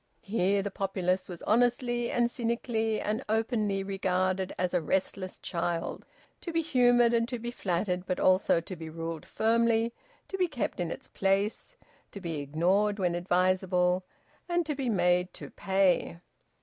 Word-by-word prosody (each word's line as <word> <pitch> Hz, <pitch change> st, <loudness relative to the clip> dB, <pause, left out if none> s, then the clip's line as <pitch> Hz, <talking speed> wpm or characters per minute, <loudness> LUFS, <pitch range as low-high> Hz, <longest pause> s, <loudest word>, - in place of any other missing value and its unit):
Here 200 Hz, -1 st, +1 dB
the 200 Hz, -, -3 dB
populace 185 Hz, -1 st, -1 dB
was 175 Hz, -2 st, -8 dB
honestly 240 Hz, +1 st, +2 dB
and 240 Hz, 0 st, +1 dB
cynically 230 Hz, -2 st, -1 dB
and 215 Hz, +5 st, -2 dB
openly 215 Hz, -3 st, 0 dB
regarded 185 Hz, -1 st, 0 dB
as 180 Hz, 0 st, -1 dB
a 180 Hz, -, +2 dB
restless 185 Hz, +3 st, -1 dB
child, 170 Hz, -1 st, -3 dB, 0.3 s
to 340 Hz, -, -4 dB
be 330 Hz, 0 st, +1 dB
humoured 245 Hz, -5 st, +4 dB
and 230 Hz, 0 st, +2 dB
to 250 Hz, -, -3 dB
be 235 Hz, +1 st, -5 dB
flattered, 180 Hz, -3 st, -2 dB
but 180 Hz, -, -1 dB
also 185 Hz, -2 st, +4 dB
to 185 Hz, +3 st, -7 dB
be 160 Hz, -1 st, -8 dB
ruled 165 Hz, -1 st, -5 dB
firmly, 230 Hz, +1 st, +2 dB, 0.3 s
to 385 Hz, -, -5 dB
be 365 Hz, -, +3 dB
kept 260 Hz, -, -3 dB
in 175 Hz, -2 st, -1 dB
its -, -, -7 dB
place, 200 Hz, -, -1 dB, 0.4 s
to 200 Hz, -, -6 dB
be 165 Hz, -5 st, -4 dB
ignored 180 Hz, +9 st, +1 dB
when 180 Hz, -3 st, +1 dB
advisable, 180 Hz, +1 st, +2 dB, 0.5 s
and 345 Hz, -1 st, +1 dB
to 300 Hz, -, -1 dB
be 270 Hz, -3 st, -2 dB
made 180 Hz, -2 st, +2 dB
to -, -, -9 dB
pay. 190 Hz, -3 st, +1 dB
195 Hz, 160 wpm, -29 LUFS, 180-235 Hz, 0.5 s, humoured